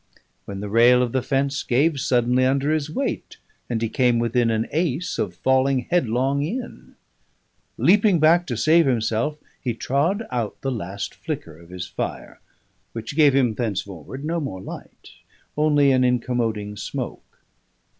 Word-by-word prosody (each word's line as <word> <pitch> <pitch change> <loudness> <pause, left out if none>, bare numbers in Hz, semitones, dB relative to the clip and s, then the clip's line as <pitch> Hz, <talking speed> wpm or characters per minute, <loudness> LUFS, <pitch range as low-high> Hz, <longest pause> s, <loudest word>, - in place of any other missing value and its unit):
when 100 -1 -6
the 105 - -4
rail 120 +4 +5
of 120 - -2
the 130 - 0
fence 140 +2 0
gave 140 +4 +1
suddenly 125 0 +2
under 135 +3 +1
his 155 -1 -1
weight, 270 - -3 0.3
and 115 -2 -1
he - - +1
came 120 +1 +2
within 115 0 +1
an 110 0 0
ace 165 +1 -1
of 90 -4 -2
falling 130 +4 +2
headlong 135 -3 +1
in. 230 - -6 0.8
Leaping 200 -2 +4
back 170 +3 +4
to 120 - -3
save 160 +4 +4
himself, 120 +4 0 0.3
he 120 -3 -1
trod 165 - 0
out 120 -4 -3
the 135 - -2
last 100 -4 -5
flicker 80 - -6
of 85 +1 -17
his 90 0 -6
fire, - - -6 0.5
which 115 +4 -6
gave 145 -4 +5
him 125 -5 +3
thenceforward 105 - -5
no 170 +2 -1
more 135 - -5
light, - - -10 0.4
only 145 -2 +3
an 130 -1 +3
incommoding 115 -4 -1
smoke. - - -7
130 Hz, 155 wpm, -23 LUFS, 115-145 Hz, 0.8 s, rail